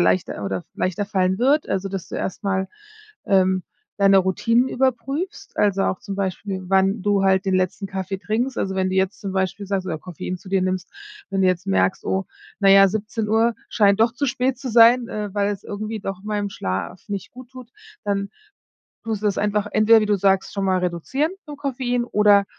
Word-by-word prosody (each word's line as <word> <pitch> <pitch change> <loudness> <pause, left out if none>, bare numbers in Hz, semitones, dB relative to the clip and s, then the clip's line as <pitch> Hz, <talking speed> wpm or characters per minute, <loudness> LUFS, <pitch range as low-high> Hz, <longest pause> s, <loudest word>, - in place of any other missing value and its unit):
leichter 95 +3 +1
oder 95 -2 -3
leichter 185 +2 -1
fallen 190 -2 0
wird. 280 +5 +2
Also, 195 +1 -1
dass 195 -2 -5
du - - -8
erst 190 - -4
mal, 190 -1 0 0.6
ähm, 185 -1 +3 0.4
deine 195 -1 +6
Routinen 230 +7 +2
überprüfst, 270 - -2
also, 200 -2 +2
auch, 190 - 0
zum 200 - -6
Beispiel, 195 0 -3
wann 195 +1 +2
du 205 -1 +2
halt 190 -1 +3
den 190 -1 +1
letzten 185 +2 -1
Kaffee 195 0 -4
trinkst. 230 +6 -2
Also, 190 - -2
wenn 190 0 0
du 185 - -2
jetzt 190 +1 0
zum 195 -2 -4
Beispiel 190 +1 -2
sagst 195 -1 -2
oder 160 -4 -3
Koffein 180 +2 -6
zu 190 - -14
dir 190 -1 +1
nimmst. 185 0 -2 0.4
Wenn 195 0 0
du - - +4
jetzt 185 0 0
merkst: 190 -1 +1
„Oh, 190 0 0 0.3
na 195 -1 +4
ja, 195 0 +8
17:00 220 +2 0
scheint 200 -1 +3
doch 225 +1 +4
zu 285 - -2
spät 255 0 0
zu 260 -1 -6
sein, 235 +1 +6
äh, 210 -1 -4
weil 205 0 +1
es 200 - -8
irgendwie 215 +1 -5
doch 195 -1 -5
meinem 210 -1 -2
Schlaf 95 - -4
nicht 200 -2 -5
gut 250 0 -12
tut“, 255 -2 -11 0.4
dann 200 -1 -1 0.7
tust 220 -2 -2
du - - +1
das 200 - +1
einfach 210 0 0
entweder, 220 +1 +6
wie 215 - 0
du 210 - +2
sagst, 195 0 +1
schon 200 -1 -1
mal 190 -1 +2
reduzieren 180 - -1 0.2
den 290 - -7
Koffein 250 -3 -1
oder 210 -3 +4
200 Hz, 200 wpm, -22 LUFS, 190-225 Hz, 0.7 s, ja